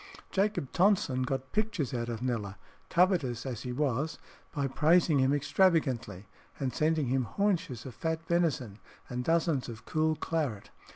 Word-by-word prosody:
Jacob 200 -8 0
Tonson 180 -9 +3
got 130 +1 -2
pictures 210 - -1
out 120 -1 -2
of 115 0 -4
Kneller, 110 -6 -2 0.3
covetous 165 - +2
as 120 -4 -4
he 125 - -4
was, 145 +3 -1 0.3
by 140 -1 -1
praising 155 +2 +3
him 130 +1 +3
extravagantly, 145 - +1 0.3
and 130 -3 -1
sending 155 +1 +1
him 130 -1 +1
haunches 175 - -1
of 130 - -7
fat 160 +3 -3
venison 150 - 0 0.3
and 125 0 -3
dozens 165 -4 +1
of 110 -1 -9
cool 155 0 +1
claret. 150 -10 -3
140 Hz, 150 wpm, -30 LUFS, 125-165 Hz, 0.3 s, Tonson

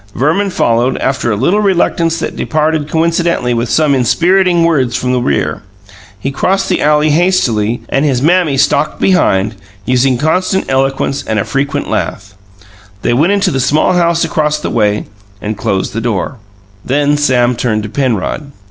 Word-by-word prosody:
Verman 165 +9 +1
followed, 120 -6 +1
after 135 -2 -1
a - - 0
little 170 - +1
reluctance 170 -4 +1
that - - -4
departed 155 -1 -1
coincidentally 165 -5 0
with 115 0 -2
some 150 +4 +2
inspiriting 175 - +2
words 135 -8 +1
from 125 - -2
the 125 - +1
rear. 70 - -1 0.6
He 135 +7 -3
crossed 190 +7 0
the - - 0
alley 150 +1 +3
hastily, 130 - +1
and 135 - 0
his 135 -5 +1
Mammy 160 -1 +2
stalked 150 +3 +1
behind, 110 - +2 0.3
using 130 0 +2
constant 185 +7 0
eloquence 135 +1 -1
and 110 - -1
a 100 - 0
frequent 140 +1 -2
lath. 95 0 -3 0.7
They - - +1
went 155 +11 +2
into 200 -2 +1
the 135 - -1
small 150 +7 +2
house 170 -1 +2
across 150 -2 0
the 150 - -4
way 105 -2 0 0.3
and 105 +2 -4
closed 95 -1 -2
the 115 - -3
door. 115 +3 -2 0.5
Then 145 +2 +1
Sam 125 -4 +2
turned 110 -3 -1
to 105 - -6
Penrod. 130 +3 -2
140 Hz, 165 wpm, -13 LUFS, 120-165 Hz, 0.7 s, alley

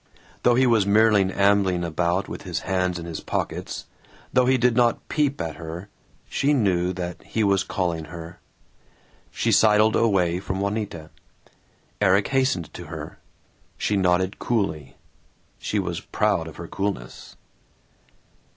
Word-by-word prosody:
Though 120 - +4
he 130 +2 +4
was 115 -5 +3
merely 105 -2 +4
ambling 100 -3 +2
about 85 +3 0
with - - -7
his - - -4
hands 90 -2 0
in 85 - -6
his 85 -2 -5
pockets, - - -4 0.5
though 125 0 +4
he 130 0 +4
did 125 -1 +2
not 120 -1 +2
peep 145 -2 0
at 80 -2 -4
her, 85 +4 -7 0.4
she 145 +2 +1
knew 90 -8 +2
that 90 -1 -5
he 110 - -1
was 100 -2 +3
calling 85 -4 -2
her. 85 +1 -9 0.9
She - - -1
sidled 110 0 +5
away 90 -6 +2
from 95 0 -4
Juanita. 100 -6 -3 0.9
Erik 100 0 +3
hastened 130 - 0
to - - -8
her. - - -8 0.6
She 105 - 0
nodded 95 0 +1
coolly 100 - -2 0.6
(she - - -2
was - - -2
proud - - 0
of - - -10
her - - -8
coolness). 95 -12 -5
95 Hz, 140 wpm, -24 LUFS, 90-110 Hz, 0.9 s, sidled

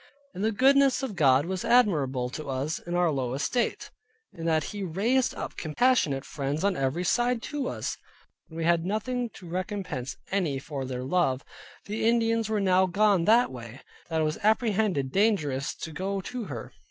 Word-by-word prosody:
And 190 - -4
the 220 - +2
goodness 270 +3 +4
of 225 -7 -3
God 140 -3 +4
was 185 0 -3
admirable 140 - +2
to 155 0 -6
us 135 +4 -2
in 175 0 -5
our 175 -2 +3
low 130 -3 -2
estate, 235 - -1 0.4
in 165 - -7
that 160 -2 +2
He 205 - -5
raised 220 +9 +1
up - - -5 0.2
passionate 200 - +3
friends 145 +2 -3
on 200 -1 +2
every 135 +6 -1
side 240 +5 +1
to 290 -3 -3
us, - - -3 0.5
when 160 - -11
we 165 - -2
had 170 0 +3
nothing 235 +5 -2
to 180 - -11
recompense 180 -7 -4
any 175 -8 0
for 135 0 -5
their 125 -1 -4
love. 135 -3 +1 0.4
The 210 +2 -3
Indians 230 -1 +2
were 215 -1 +1
now 190 -1 +3
gone 195 -1 +3
that 235 +3 +4
way, 120 0 -9 0.3
that 160 -1 0
it - - +2
was 155 0 -1
apprehended 210 - +1
dangerous 155 -10 +1
to 160 - -7
go 195 +5 -2
to 235 +4 -5
her. 125 - -7
180 Hz, 180 wpm, -27 LUFS, 145-220 Hz, 0.5 s, goodness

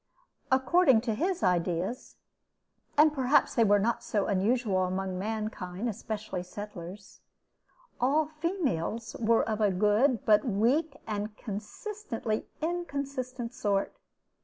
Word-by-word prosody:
According 265 -1 +4
to 230 -2 -1
his 350 - -1
ideas 180 +4 0 0.8
(and 300 +1 +6
perhaps 270 0 +3
they 235 - +4
were 205 -1 +5
not 235 +3 0
so 205 -4 0
unusual 200 -1 +1
among 185 0 -2
mankind, 215 -1 -3
especially 215 -3 -4
settlers), 195 0 -9 0.8
all 290 +5 +3
"females" 295 - -2
were 230 0 +3
of 220 -1 -1
a 210 - +4
good 210 +6 +2
but 210 -1 +5
weak 265 +7 +1
and 210 -1 -4
consistently 225 - -4 0.2
inconsistent 275 -7 -3
sort. 200 -6 0
225 Hz, 110 wpm, -29 LUFS, 200-265 Hz, 0.8 s, and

